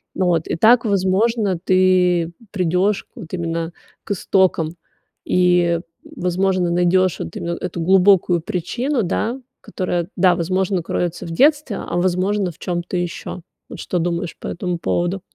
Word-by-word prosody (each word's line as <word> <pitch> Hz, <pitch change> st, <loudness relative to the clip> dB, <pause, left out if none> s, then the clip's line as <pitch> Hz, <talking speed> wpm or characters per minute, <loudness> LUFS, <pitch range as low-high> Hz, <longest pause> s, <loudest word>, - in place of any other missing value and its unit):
Вот, 175 Hz, -4 st, +1 dB
и -, -, -1 dB
так, 230 Hz, +8 st, +5 dB
возможно, 200 Hz, 0 st, +1 dB
ты 180 Hz, -3 st, +3 dB, 0.2 s
придёшь 185 Hz, +2 st, 0 dB
вот 195 Hz, -11 st, -10 dB
именно 165 Hz, -1 st, -3 dB, 0.3 s
к -, -, -8 dB
истокам 185 Hz, -4 st, +1 dB, 0.5 s
и, 175 Hz, -2 st, +2 dB, 0.2 s
возможно, 180 Hz, 0 st, -1 dB
найдёшь 180 Hz, +1 st, +2 dB
вот 80 Hz, -, -6 dB
именно 170 Hz, 0 st, -3 dB
эту 170 Hz, -, -5 dB
глубокую 185 Hz, -1 st, +4 dB
причину, 235 Hz, -, -2 dB
да, 230 Hz, +8 st, -2 dB, 0.2 s
которая, 175 Hz, -2 st, -3 dB
да, 185 Hz, -2 st, +5 dB
возможно, 185 Hz, +1 st, 0 dB
кроется 175 Hz, 0 st, -3 dB
в 165 Hz, -, -6 dB
детстве, 290 Hz, -, +2 dB
а, -, -, -4 dB
возможно, 185 Hz, +2 st, +1 dB
в 160 Hz, -, -20 dB
чём-то 175 Hz, 0 st, -3 dB
ещё. 175 Hz, 0 st, -4 dB, 0.3 s
Вот -, -, -9 dB
что 180 Hz, -, -2 dB
думаешь 170 Hz, 0 st, -2 dB
по -, -, -7 dB
этому 180 Hz, 0 st, -3 dB
поводу? 175 Hz, +3 st, -1 dB
180 Hz, 140 wpm, -20 LUFS, 170-195 Hz, 0.5 s, так